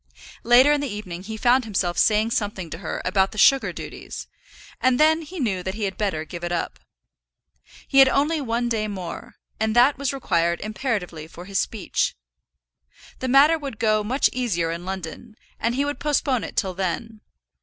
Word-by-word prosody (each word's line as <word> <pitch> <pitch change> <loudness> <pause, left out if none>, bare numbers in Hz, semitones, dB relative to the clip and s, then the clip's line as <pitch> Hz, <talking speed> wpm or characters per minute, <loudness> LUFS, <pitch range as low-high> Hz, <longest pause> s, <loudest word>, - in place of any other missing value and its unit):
Later 250 +5 +6
in 295 -1 +2
the 285 - -3
evening 185 -4 -6
he 220 +3 -7
found 250 +3 +3
himself 190 -5 -1
saying 215 +4 +3
something 205 -7 -2
to 165 - -6
her 175 - -5
about 190 +1 +2
the 215 - -10
sugar 270 +5 +5
duties, - - -8 0.6
and 255 -1 +3
then 315 +1 +4
he 335 +3 -8
knew 200 -9 -1
that 190 +2 -4
he 220 - -4
had 190 -2 -2
better 165 -7 -2
give 170 +3 -8
it 175 - -3
up. 175 - -3 1.1
He 275 - +4
had 270 -1 +8
only 295 +4 +1
one 240 -1 -1
day 220 -2 -1
more, 185 -4 -7 0.2
and 220 0 0
that 255 +4 +5
was 280 -2 0
required 170 -10 0
imperatively 210 - -3
for 175 +2 -11
his 195 0 -1
speech. 210 -5 -1 1.0
The 260 - -3
matter 285 +5 +5
would 275 -7 -6
go 215 -1 +2
much 255 +7 +2
easier 180 -10 -1
in 170 +1 -6
London, 190 +4 -7 0.2
and 230 +2 0
he 280 +2 +1
would 290 0 -3
postpone 275 -5 0
it - - -9
till 190 -3 0
then. 210 +4 -4
220 Hz, 185 wpm, -23 LUFS, 185-260 Hz, 1.1 s, had